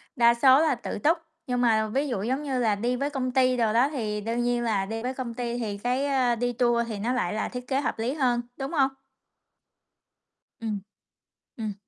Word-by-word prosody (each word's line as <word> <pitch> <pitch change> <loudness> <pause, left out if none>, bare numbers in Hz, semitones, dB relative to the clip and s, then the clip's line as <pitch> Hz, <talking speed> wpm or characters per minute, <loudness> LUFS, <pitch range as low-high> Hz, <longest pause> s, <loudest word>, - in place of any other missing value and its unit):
đa 235 -1 +5
số 260 +3 +6
là 310 -4 +3
tự 235 - -5
túc. 320 +9 +3 0.3
Nhưng 250 -1 0
mà 220 -2 +3
ví 275 +7 -1
dụ, 235 -7 -2
giống 260 +5 -1
như 270 -3 -1
là, 220 -4 +2
đi 240 +5 -1
với 280 +3 -1
công 260 -3 -2
ty 255 -1 +3
đồ 225 -2 +2
đó 245 +4 +4
thì 215 -7 -2
đương 230 +3 -1
nhiên 240 0 +1
là 210 -4 0
đi 225 +3 -4
với 255 +1 -2
công 255 -3 -5
ty 240 0 -3
thì 210 -4 -3
cái, 250 +6 0
ơ, 260 -4 +2
đi 245 +1 -1
tour 235 -1 +2
thì 215 -3 -5
nó 235 +5 0
lại 215 -7 0
là 215 - -2
thiết 250 0 -7
kế 270 0 +1
hợp 255 - -2
lý 235 +4 -1
hơn, 250 -5 +1 0.2
đúng 270 0 -4
hông? 270 -5 +2 1.7
Ừm. 215 -3 -3 0.8
Ừm. 215 -2 -3
245 Hz, 220 wpm, -26 LUFS, 225-260 Hz, 1.7 s, số